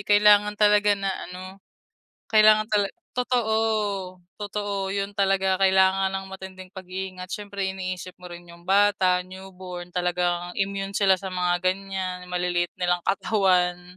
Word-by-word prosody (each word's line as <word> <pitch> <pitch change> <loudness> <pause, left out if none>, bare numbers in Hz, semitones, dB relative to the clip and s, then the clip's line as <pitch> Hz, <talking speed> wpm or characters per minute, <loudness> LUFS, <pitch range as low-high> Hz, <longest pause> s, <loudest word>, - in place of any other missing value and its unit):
kailangan 210 0 +5
talaga 210 -1 +4
na 195 -1 -2 0.2
ano, 185 +2 -10 0.7
kailangan 215 0 +5
tala 205 -1 +2 0.2
totoo 245 -3 0 0.9
totoo 205 -1 -3
yun 200 0 -2
talaga 195 -1 +1
kailangan 190 0 +4
ng 195 0 -4
matinding 190 -1 -10
pagiingat 185 -1 -7
syempre 200 -2 -4
iniisip 185 -1 -5
mo 180 -1 -12
rin 175 0 -11
yung 170 0 -15
bata 190 -1 +3
newborn, 185 -1 -9
talagang 175 0 -1
immune 195 0 -2
sila 190 -2 +3
sa 195 - -6
mga 180 -1 0
ganyan 185 -1 -3
maliliit 175 -1 -1
nilang 175 -1 0
katawan. 180 -3 +1
190 Hz, 130 wpm, -25 LUFS, 180-200 Hz, 0.9 s, kailangan